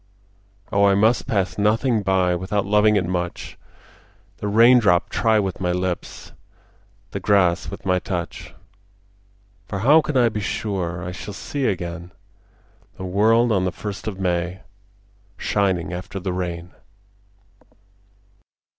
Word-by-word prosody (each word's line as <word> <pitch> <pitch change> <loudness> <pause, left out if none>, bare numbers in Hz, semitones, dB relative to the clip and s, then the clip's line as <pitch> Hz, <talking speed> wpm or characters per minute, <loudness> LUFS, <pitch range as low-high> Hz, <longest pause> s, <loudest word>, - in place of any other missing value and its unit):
Oh 100 0 +3
I 100 -1 +4
must 110 +4 +2
pass 100 -2 -1
nothing 110 +2 +2
by 95 -2 +2
Without 95 +3 -1
loving 105 +1 +4
it 95 -3 +1
much, 90 -1 -4 0.8
The 105 - -4
raindrop 110 -4 +5
try 110 -1 +2
with 95 -4 -1
my 90 -1 0
lips, 90 0 -4 0.8
The 100 - -4
grass 95 -3 +2
with 100 - -9
my 90 -1 +2
touch; 90 -2 -5 1.1
For 100 -2 -4
how 155 +4 +7
can 150 -3 -2
I 120 -2 +4
be 110 - -4
sure 90 -4 -3
I 90 - -5
shall 100 +2 -8
see 140 +7 -3
again 85 -2 -4 0.9
The 95 - -6
world 110 +5 +3
on 95 -4 +2
the 90 - 0
first 105 +2 -7
of 100 -3 -4
May 90 0 -1 0.8
Shining 95 -3 0
after 95 +2 -6
the 90 0 -3
rain? 90 -1 -4
95 Hz, 135 wpm, -22 LUFS, 90-105 Hz, 1.1 s, how